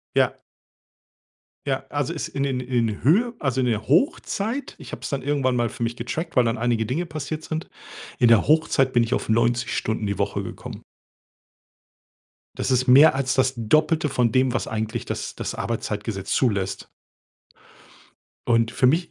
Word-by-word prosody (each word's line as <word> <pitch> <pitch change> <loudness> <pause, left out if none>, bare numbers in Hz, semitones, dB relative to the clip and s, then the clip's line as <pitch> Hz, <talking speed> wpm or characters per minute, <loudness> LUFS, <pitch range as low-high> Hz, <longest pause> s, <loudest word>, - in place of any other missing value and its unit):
Ja. - - +3 1.3
Ja, - - -1
also, - - -2
es - - -3
in 140 - -4
den 130 -2 -1
in 120 -2 0
den 105 -2 -4
Höhe 230 - +3
also, 130 -2 0
in 125 - +1
der 110 -3 -1
Hochzeit 230 - 0
ich - - -11
habe - - -7
es - - -4
dann 140 - -1
irgendwann 135 -3 0
mal 120 -1 +1
für 120 - -8
mich 115 0 -1
getrackt, 130 +8 -4
weil 125 -2 +4
dann 115 - 0
einige 115 -1 0
Dinge 155 +9 -1
passiert 155 -1 -5
sind. 160 +1 -4 0.5
In 120 - +5
der 115 -3 +5
Hochzeit 135 -4 +3
bin 120 - +5
ich 115 - -6
auf - - -1
90 115 +2 +1
Stunden 110 -1 -2
die 100 -1 -2
Woche - - -1
gekommen. - - -8 1.7
Das - - -2
ist 130 +1 +1
mehr 140 +4 +8
als 135 -1 0
das 130 0 +2
Doppelte 155 +7 +2
von 125 -4 +1
dem, 130 -1 +3
was - - -1
eigentlich 110 0 -3
das - - -5
das - - -4
Arbeitszeitgesetz 105 -3 -3
zulässt. 100 -7 0 1.6
Und 115 -1 +3
für 130 - +2
mich 165 +6 +2
125 Hz, 175 wpm, -23 LUFS, 115-145 Hz, 1.7 s, mehr